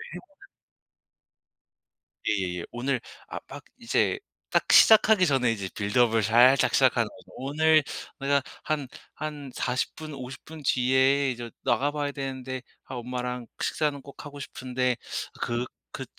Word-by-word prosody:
해 - - -5
보 365 +4 -20 1.8
예예예. 90 -3 -1
오늘 125 +1 -1 0.3
아 - - -6
막 - - -9 0.2
이제 400 - +1 0.3
딱 - - +3
시작하기 220 -3 +7
전에 135 -6 +2
이제 100 -4 -3
빌드업을 110 +1 +2
살짝 120 +5 +5
시작하는 - - +4
거죠. - - -16
"오늘 155 +3 +3 0.4
내가 140 0 +2 0.2
한 145 -4 -1 0.3
한 150 -3 -6
40 125 0 -1
분 155 -1 -8
50 130 -1 -8
분 160 -1 -10
뒤에 130 +2 +3
이제 120 -1 -6
나가 145 +2 +2
봐야 145 -1 -2
되는데 130 -2 -5 0.2
아 - - -7
엄마랑 125 0 -4
식사는 150 -2 0
꼭 140 +2 -12
하고 145 -1 -9
싶은데 125 -2 -2 0.4
그 120 +1 -1 0.3
그 - - -5
130 Hz, 245 characters per minute, -27 LUFS, 125-145 Hz, 1.8 s, 시작하기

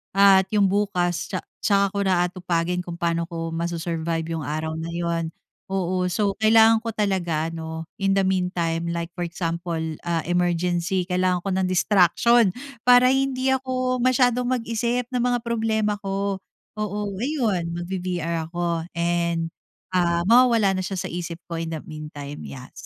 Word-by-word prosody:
at 195 -1 +6
yung 200 -2 +4
bukas 185 -4 0
tsa - - -3 0.2
tsaka 200 -1 +2
ko 200 - -3
na 180 -2 +3
aatupagin 180 -1 -1
kung 175 -1 -5
paano 170 -1 -1
ko 165 -1 -4
masu-survive 165 -1 -2
yung 145 - -5
araw 160 +1 -3
na 165 - -4
yun. 170 -1 -1 0.4
Oo. 185 -1 0
So 195 +2 -1
kailangan 220 +1 +6
ko 225 -1 -5
talaga 175 -6 0
ano, 160 0 -5 0.2
in 195 0 +2
the 195 - +3
meantime 180 -3 0
like 170 0 -3
for 175 0 -4
example, 170 -1 -3 0.2
ah, 170 -1 0
emergency 175 +1 0
kailangan 180 0 0
ko 195 - -2
ng 185 0 +1
distraction 195 +4 +4 0.3
para 250 +1 +7
hindi 265 -1 +1
ako 255 -1 0
masyadong 250 0 +3
mag-isip 240 0 -1
ng 250 - 0
mga 245 0 +1
problema 220 -3 0
ko. 195 0 -2 0.4
Oo, 210 0 -2
ayun 215 - -1
magbi-VR 175 -2 -3
ako 170 -1 -2
and, 170 -1 0 0.4
ah, 170 -1 +2
mawawala 230 -2 +5
na 185 - -2
siya 190 +1 -4
sa - - -3
isip 170 -1 -4
ko 165 -1 -5
in 165 - -3
the 155 - -6
meantime. 150 -2 -8
Yes. 130 -1 -10
180 Hz, 155 wpm, -24 LUFS, 170-210 Hz, 0.4 s, para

